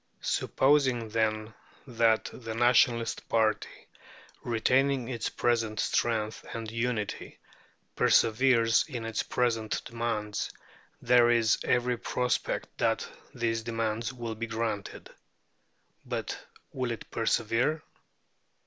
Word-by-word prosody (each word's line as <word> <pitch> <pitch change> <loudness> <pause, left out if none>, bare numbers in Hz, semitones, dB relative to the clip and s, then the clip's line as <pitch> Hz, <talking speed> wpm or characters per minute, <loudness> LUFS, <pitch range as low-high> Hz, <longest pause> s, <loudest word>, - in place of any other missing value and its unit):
Supposing, 130 -5 +2
then, 110 0 -1 0.3
that 115 -3 +2
the 115 -2 -6
Nationalist 120 -1 +2
party, 110 -2 0 0.6
retaining 130 +2 +1
its 120 -3 -3
present 115 -3 0
strength 110 -2 0
and 115 -1 -5
unity, 115 -2 -3 0.6
perseveres 115 0 +4
in 120 -7 -5
its 110 -1 -1
present 115 -2 0
demands, 115 -3 -3 0.5
there 120 -1 +5
is 115 -2 +3
every 125 0 +1
prospect 125 0 -2
that - - +1 0.3
these 115 -1 -1
demands 115 +1 -2
will 120 -3 -5
be 115 +1 -5
granted. 110 -3 -4 0.9
But - - -5 0.3
will 130 -2 -2
it 115 - -6
persevere? 115 +7 0
115 Hz, 100 wpm, -29 LUFS, 110-120 Hz, 0.9 s, there